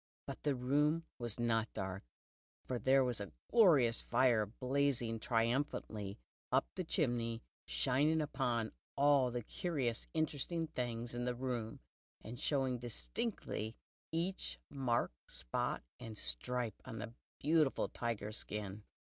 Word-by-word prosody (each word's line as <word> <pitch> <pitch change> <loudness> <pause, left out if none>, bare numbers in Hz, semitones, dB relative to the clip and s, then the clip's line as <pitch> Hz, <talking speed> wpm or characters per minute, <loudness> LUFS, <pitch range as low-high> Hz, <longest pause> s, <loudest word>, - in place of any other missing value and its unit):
But - - -6
the 145 -2 +1
room 150 +6 +2
was 120 -2 -1
not 115 -1 +2
dark, 95 0 -3 0.6
for 125 -2 -2
there 130 +4 +5
was 125 -4 +1
a 100 -5 -5 0.2
glorious 150 - +6
fire, 115 -5 +3
blazing 125 -1 0
triumphantly 115 -3 0 0.3
up 130 +2 +4
the 185 - -2
chimney, 120 -8 0 0.2
shining 130 - +3
upon 125 -6 0 0.2
all 140 -2 +5
the 120 -1 -3
curious 130 -4 -1
interesting 160 +1 0
things 120 -5 -3
in 120 0 -2
the 125 0 0
room, 120 -3 -3 0.4
and 120 +2 -7
showing 130 -4 +1
distinctly 110 - -3 0.4
each 170 +4 -1
mark, 130 -4 +1 0.2
spot, 60 -2 -1 0.2
and 110 -2 -7
stripe 110 - -1
on 115 - -6
the 115 +2 -5 0.3
beautiful 155 -1 +3
tiger 115 -3 -3
skin. 105 -2 -4
120 Hz, 125 wpm, -37 LUFS, 115-140 Hz, 0.6 s, glorious